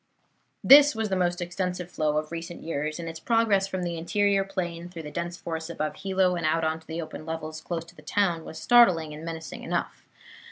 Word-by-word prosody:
This 290 0 +8
was 220 -1 -1
the 190 - 0
most 175 0 0
extensive 180 0 -3
flow 150 -1 0
of 155 +1 -2
recent 170 +1 -6
years, 155 -1 -3
and 170 - -5
its 165 0 -6
progress 225 -4 +2
from 185 -2 -3
the 170 -1 -3
interior 200 +3 +2
plain 175 -3 -4
through 170 -2 -8
the 150 - -7
dense 170 +3 -4
forests 160 -1 -5
above 155 -2 -3
Hilo 190 -2 +1
and 170 - -3
out 160 +1 +1
on 160 0 0
to 160 - -23
the 160 +1 -4
open 155 -1 -6
levels 155 -1 -5
close 165 -1 -4
to 170 +1 -17
the 155 - -14
town 170 0 0
was 160 - -9
startling 165 -6 +5
and 150 +1 -9
menacing 165 -1 -6
enough. - - -3
170 Hz, 215 wpm, -27 LUFS, 160-185 Hz, -, This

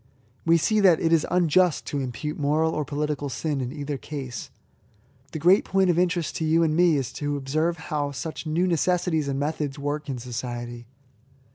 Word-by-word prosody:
We 165 0 +6
see 215 +7 +2
that 185 -5 +5
it 165 0 +2
is 160 -2 +3
unjust 180 -1 +3
to 145 - -3
impute 135 +4 -4
moral 155 +3 +2
or 150 - -1
political 145 0 -2
sin 145 0 -2
in 125 -1 -3
either 145 -1 -4
case. 130 -5 -6 0.8
The - - -4
great 180 +6 +5
point 190 -1 +2
of 170 - +1
interest 175 -2 0
to - - -2
you 160 +1 +3
and 155 -1 +1
me 175 -1 +4
is 135 -3 -3
to 145 -1 -2
observe 155 +5 -1
how 150 -4 -2
such 155 +3 -6
new 165 +4 +1
necessities 170 -2 +1
and 135 -1 -1
methods 145 -1 -2
work 145 +1 -3
in 130 - -2
society. 120 0 -6
150 Hz, 185 wpm, -25 LUFS, 140-165 Hz, 0.8 s, We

